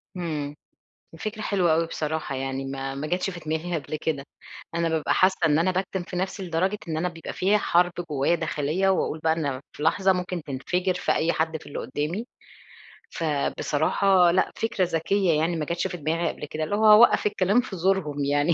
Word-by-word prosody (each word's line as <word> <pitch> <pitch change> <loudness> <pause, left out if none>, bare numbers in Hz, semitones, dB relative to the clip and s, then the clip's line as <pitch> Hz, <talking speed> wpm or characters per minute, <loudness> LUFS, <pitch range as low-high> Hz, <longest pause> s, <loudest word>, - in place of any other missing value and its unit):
امم. 150 -5 -3 0.6
الفكرة 215 +6 -5
حلوة 180 -6 +2
أوي 165 +1 +2
بصراحة 155 -3 -3
يعني 135 0 -3
ما 135 0 -4
ما 140 +2 -4
جاتش 180 +4 -1
في 180 - -7
دماغي 160 +2 -3
قبل 155 - -6
كده. 150 -2 -2 0.5
أنا 170 0 +1
بابقى 160 -1 +1
حاسة 185 0 +3
إن 150 -1 +3
أنا 180 +3 +2
باكتم 185 0 -2
في 180 - -8
نفسي 190 +2 -2
لدرجة 185 +4 0
إن 160 -1 -2
أنا 180 +3 0
بيبقى 165 -2 -8
فيّا 200 +3 +2
حرب 175 -3 +3 0.2
جوايا 145 +3 +2
داخلية، 160 +3 0
وأقول 180 -4 0
بقى 160 0 +2
إن 160 -2 -2
أنا 135 -1 -2
في 150 - -7
لحظة 190 +4 +3
ممكن 180 -2 -3
تنفجر 180 +7 -1
في 180 - -1
أي 165 +1 +1
حد 160 0 -1
في - - -15
اللي 145 - -5
قدامي. 155 - -3 0.9
فبصراحة 165 +4 +2
لأ، 185 - +2
فكرة 220 -4 0
ذكية 175 +2 +1
يعني 165 +2 +1
ما 155 - -1
جاتش 170 +4 -2
في 185 - -4
دماغي 165 +1 -1
قبل - - -6
كده، 155 +1 -3
اللي 205 - -1
هو 215 0 +6
أوقف 225 +1 +6
الكلام 205 +3 +3
في 215 -6 -7
زورهم 165 -6 0
يعني، 145 +3 +2
165 Hz, 195 wpm, -25 LUFS, 155-185 Hz, 0.9 s, هو